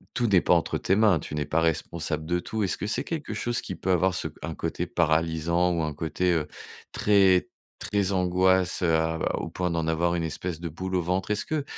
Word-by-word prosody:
Tout 120 -2 +1
n'est 95 -4 +4
pas - - +3
entre - - +1
tes 95 - +1
mains, 105 -5 +4
tu 75 - -7
n'es 75 -1 -1
pas 75 +3 0
responsable 80 -1 -1
de 90 +2 0
tout. 110 +4 -3
Est-ce 95 - -1
que 105 - -4
c'est 105 - -1
quelque 155 -8 -4
chose 120 +2 -2
qui 95 - -6
peut 95 +2 -2
avoir 90 +1 +2
ce - - -1
un - - -5
côté - - -3
paralysant 85 +2 +1
ou 85 -1 0
un 75 -1 -2
côté, 85 +4 -1
heu, 80 -3 0 0.4
très, 95 -3 +3 0.3
très 100 -2 0
angoisse, 95 0 +2
heu, 85 -3 +3 0.4
au - - -4
point 90 -1 -2
d'en 80 -1 -1
avoir 85 +2 +1
une 85 - -1
espèce 80 +1 -4
de 85 -1 -4
boule 95 +4 -4
au 90 - +2
ventre? 90 +3 -2
Est-ce 105 - 0
que 155 -2 -2
90 Hz, 225 wpm, -26 LUFS, 80-95 Hz, 0.4 s, n'est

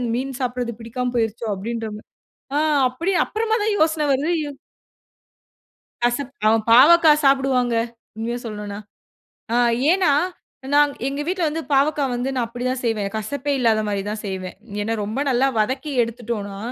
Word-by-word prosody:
மீன் 260 +1 -3
சாப்படுறது 245 -1 -2
பிடிக்காம 245 +2 -3
போயிருச்சோ?" 225 0 -1
அப்டின்ற 225 +3 -4
மாரி 210 - -12 0.5
ஆ - - +3 0.3
அப்டி 335 +10 -2
அப்பறமா 445 0 -1
தான் 425 0 +1
யோசன 315 -1 +2
வருது. 280 +5 0
இவ் 285 -2 -8 1.5
கசப்பு. 245 +3 0
அவன் 220 0 +3
பாவக்கா 315 +6 +8
சாப்டுவாங்க, 265 -3 +3 0.4
உண்மைய 235 +2 -3
சொல்லணும்னா. 210 -2 -6 0.7
அ - - +2 0.4
ஏன்னா 365 -4 +3 0.6
நான் 290 0 +5 0.2
எங்க 280 +1 -2
வீட்டுல 360 -2 0
வந்து 320 +2 -3
பாவக்கா 285 +2 +3
வந்து 245 +2 -2
நான் 250 -3 0
அப்டி 245 +2 -6
தான் 255 0 -2
செய்வேன். 220 -4 0
கசப்பே 280 +6 -2
இல்லாத 225 -3 +3
மாரி 200 -1 -1
தான் 210 0 -4
செய்வேன். 190 -2 -5 0.3
ஏன்னா 220 +2 -1
ரொம்ப 215 +6 -3
நல்லா 260 +1 +3
வதக்கி 260 +7 -1
எடுத்துட்டோம்னா, 225 -4 -5
250 Hz, 145 wpm, -22 LUFS, 225-285 Hz, 1.5 s, பாவக்கா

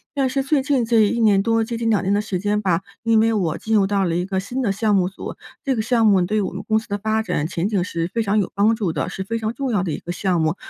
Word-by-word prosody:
但 270 -2 +1
是 270 +1 -1
最 280 0 +1
近 265 -4 +1
这 230 -1 +3
1 235 - -1
年 205 -4 +4
多 225 +1 +1
接 235 +1 -4
近 230 0 -1
2 210 -3 +2
年 195 +2 +1
的 205 - +2
时 200 -4 -3
间 205 +2 0
吧， 185 -3 +1 0.2
因 230 -2 +3
为 225 +1 +3
我 175 -7 0
进 220 0 -1
入 195 -2 +4
到 200 -1 +1
了 165 -1 -1
一 180 - -1
个 190 -1 -1
新 245 +7 -4
的 210 -6 +1
项 210 +1 +1
目 185 -1 +2
组， 190 - -8 0.3
这 270 -3 0
个 220 - 0
项 230 0 +2
目 195 -3 +5
对 210 +5 0
我 - - -4
们 - - -6
公 220 0 +3
司 220 - -4
的 205 0 -3
发 220 +1 0
展 150 -7 -1
前 170 +2 -2
景 200 -4 0
是 170 -2 -3
非 230 - 0
常 210 0 0
有 195 - -1
帮 210 +3 +3
助 195 -8 -2
的， - - -2
是 190 - -5
非 230 +4 -3
常 220 0 -2
重 270 -2 -2
要 205 -5 +1
的 175 -4 -2
一 - - -2
个 175 - -6
项 180 0 0
目， 160 +2 +1
210 Hz, 330 characters per minute, -21 LUFS, 190-225 Hz, 0.3 s, 目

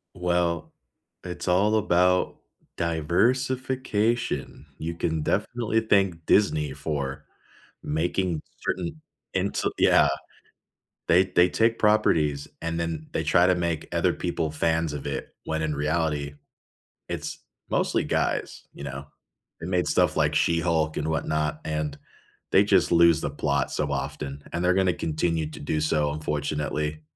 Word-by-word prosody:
Well, 85 -2 0 0.5
it's 90 0 -6
all 100 +5 +3
about 90 -3 +2 0.4
diversification, 115 - 0
you 85 +1 -4
can 80 -2 -1
definitely 115 +5 0
thank 95 -6 +1
Disney 75 -9 +2
for 70 -2 -4 0.6
making 85 +1 -1 0.2
certain 95 - -3 0.3
into 95 +1 0
yeah. - - +5 1.0
They 90 +3 +6
they 90 -1 +3
take 115 +3 +2
properties 80 -10 +2
and 85 0 -2
then 80 -2 -3
they 80 - 0
try 85 +3 +4
to 90 - +4
make 85 -3 -2
other - - +2
people 80 -2 -2
fans 80 0 0
of 75 -1 -6
it, 70 -1 -5
when 80 0 -2
in 75 -1 -1
reality, 75 -1 -1 0.7
it's - - -4 0.3
mostly - - +1
guys, - - -1
you - - -10
know, 70 0 -6 0.5
they 80 - -5
made 90 -1 +1
stuff - - +2
like - - +2
She-Hulk 85 -2 +1
and 75 - -1
whatnot, 75 -1 -1
and 75 -2 -2 0.6
they 100 - +6
just 95 -4 +3
lose 85 -2 +6
the - - -1
plot 70 -1 0
so - - -1
often, 70 +1 -4
and 85 +1 -2
they're 90 +1 +4
gonna 95 -2 +2
continue 80 -1 -1
to - - -10
do 75 +2 -1
so 75 -1 +1
unfortunately, 75 0 -2
85 Hz, 135 wpm, -26 LUFS, 75-90 Hz, 1.0 s, They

